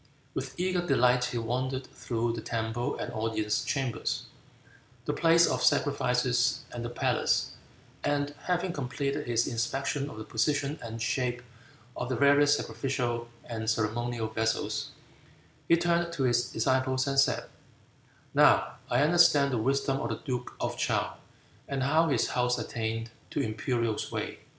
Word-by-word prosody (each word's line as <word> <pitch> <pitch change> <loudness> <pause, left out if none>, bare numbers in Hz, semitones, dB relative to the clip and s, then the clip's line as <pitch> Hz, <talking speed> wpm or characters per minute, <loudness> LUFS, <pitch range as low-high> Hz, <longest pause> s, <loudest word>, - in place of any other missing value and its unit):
With - - -5
eager 180 -1 +1
delight 125 -5 +3
he 120 - -3
wandered 130 +3 -2
through 115 -1 -2
the 115 - -4
temple 115 +2 -2
and - - -5
audience 110 -1 -1
chambers, 135 -4 -2 0.8
the - - 0
place 170 0 +5
of - - 0
sacrifices 125 -3 +2
and 120 -1 -5
the 120 - -3
palace, 120 - +1 0.5
and 145 0 0
having 180 0 0
completed 140 -1 -2
his 115 0 +2
inspection 135 +4 -1
of - - -10
the 110 - -5
position 140 +6 0
and 115 -1 -6
shape 125 0 -1 0.5
of 125 - -4
the 130 - 0
various 145 +2 +5
sacrificial 120 -3 -2 0.2
and 110 -1 -3
ceremonial 115 +1 -1
vessels, 110 0 -1 0.8
he 170 - +5
turned 170 0 +1
to 145 -5 -1
his 120 0 +2
disciples 130 0 +1
and 135 -1 +1
said, 135 - +3 0.9
"Now - - +4
I 125 +3 +3
understand 150 -4 +5
the 120 - +1
wisdom 135 +3 +1
of 115 - -2
the 115 - -2
duke 125 -3 -3
of - - -3
Chow, - - 0 0.5
and 135 -1 -1
how 160 +5 +3
his 135 -6 +1
house 125 0 +1
attained 115 0 -3 0.2
to - - -3
imperial 115 -1 -1
sway." - - -4
125 Hz, 145 wpm, -29 LUFS, 115-140 Hz, 0.9 s, place